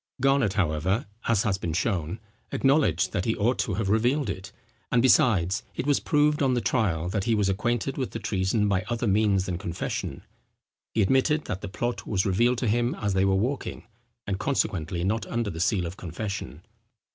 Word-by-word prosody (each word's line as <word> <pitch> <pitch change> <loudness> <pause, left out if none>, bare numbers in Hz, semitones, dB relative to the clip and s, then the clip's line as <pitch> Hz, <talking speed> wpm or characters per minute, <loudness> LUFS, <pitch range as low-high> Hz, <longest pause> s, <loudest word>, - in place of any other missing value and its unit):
Garnet, 135 -6 +3
however, 95 - 0 0.2
as 115 -4 +3
has 95 -3 0
been 85 -4 -3
shown, 90 0 -1 0.3
acknowledged 135 - +2
that 90 - -1
he 115 - +1
ought 120 +5 +1
to 100 - 0
have 100 0 -1
revealed 120 +4 +2
it; 95 +2 -8 0.4
and 125 - +4
besides, 100 -7 +4
it - - -3
was 145 -1 +3
proved 150 0 +2
on 130 -2 +3
the - - +2
trial, 95 -7 0
that 95 +2 -2
he 115 - +2
was 105 -2 +1
acquainted 120 +7 -1
with 130 - -1
the - - -5
treason 105 0 0
by 95 -2 +1
other 120 0 -1
means 100 -2 +2
than 90 -2 -3
confession. 85 -6 -4 0.7
He 110 - +4
admitted 135 +8 +2
that 95 - -4
the 100 - -5
plot 120 +5 -3
was 95 -3 0
revealed 120 +6 +2
to 120 - -1
him 120 +3 +1
as 100 -2 -2
they 95 0 +2
were 95 0 +3
walking, 125 +8 -2 0.4
and 100 -1 -2
consequently 85 - -1
not 110 +3 -1
under 115 -3 -2
the 80 - -7
seal 90 +1 +1
of 85 +3 -6
confession. 90 -2 -5
105 Hz, 190 wpm, -26 LUFS, 95-120 Hz, 0.7 s, and